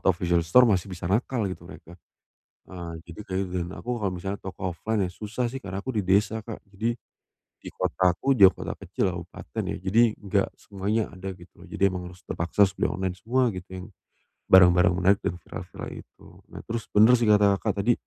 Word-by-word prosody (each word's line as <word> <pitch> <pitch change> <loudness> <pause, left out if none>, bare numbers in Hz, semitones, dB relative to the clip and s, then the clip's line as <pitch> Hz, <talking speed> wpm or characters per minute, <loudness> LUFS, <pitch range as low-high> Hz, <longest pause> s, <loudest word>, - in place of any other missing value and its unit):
atau 95 - +3
official 85 -1 0
store, 125 +9 +6
masih 95 -2 0
bisa 85 -1 -5
nakal 110 +1 0
gitu 95 -2 -8
mereka. 85 -1 -13 0.7
Eee, 85 -2 -7
jadi 85 +2 -11
kayaknya 95 0 -2
dan 85 - -4
aku 120 -1 -4
kalau 100 -2 0
misalnya 95 +3 -4
toko 95 -1 -4
offline 105 +3 -1
ya - - -4
susah 110 +5 -3
sih, 135 +1 -6
karena 95 0 -5
aku 130 - -4
di 105 - +1
desa, 105 +4 +2
Kak, 110 0 -9
jadi 115 +4 -1 0.6
di - - -12
kotaku 95 +9 +1
juga 95 -5 +8
kota - - -4
kecil, 95 - -1
kabupaten 85 -7 -6
ya, - - -3
jadi 100 +5 +3
nggak 100 -1 0
semuanya 105 +2 -2
ada 95 +1 -6
gitu. 90 0 -17
Jadi 90 - -9
emang 90 -1 -5
harus 90 +1 -17
terpaksa 85 +3 +1
sudah 95 - -2
online 95 -1 -2
semua 125 +5 +1
gitu, 90 -2 -8
yang 90 +2 -7 0.6
barang-barang 90 -1 +7
menarik 95 +2 +3
dan 85 - -2
viral-viral - - -8
itu. - - -14 0.2
Nah, - - -9
terus 115 0 -4
bener 110 +4 +7
sih 115 - +1
kata 100 -1 +5
Kakak 100 -1 -1
tadi, 120 - +4
95 Hz, 195 wpm, -26 LUFS, 90-110 Hz, 0.7 s, juga